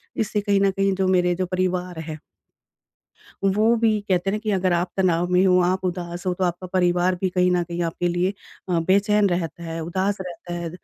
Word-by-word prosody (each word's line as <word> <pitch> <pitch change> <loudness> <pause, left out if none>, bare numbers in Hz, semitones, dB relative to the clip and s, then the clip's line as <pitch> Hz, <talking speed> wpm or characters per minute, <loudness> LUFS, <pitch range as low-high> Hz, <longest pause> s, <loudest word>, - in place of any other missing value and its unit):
इससे 210 -1 -1
कहीं 200 -1 +2
न 195 -1 +3
कहीं 195 0 +1
जो 190 0 0
मेरे 180 -1 +2
जो 185 - -1
परिवार 180 -1 -2
है 155 -1 -6 1.2
वो 215 +4 +3
भी 220 -2 +2
कहते 185 +1 +1
हैं 210 - -1
कि 215 0 -2
अगर 185 -2 +1
आप 175 +1 0
तनाव 175 -2 +2
में 180 +1 +4
हो 185 -1 +5
आप 185 +1 0
उदास 175 0 -4
हो 180 - +1
तो 185 - -3
आपका 180 +1 -2
परिवार 180 0 +2
भी 190 - +1
कहीं 180 0 +2
न 180 -1 +2
कहीं 170 +1 -5
आपके 170 +1 -1
लिए 175 +3 0 0.4
अ, 170 - +2
बेचैन 200 +1 +3
रहता 170 -1 -3
है, 165 0 -5
उदास 190 +4 -1
रहता 175 -1 -8
है, 170 -1 -4
180 Hz, 210 wpm, -23 LUFS, 175-195 Hz, 1.2 s, हो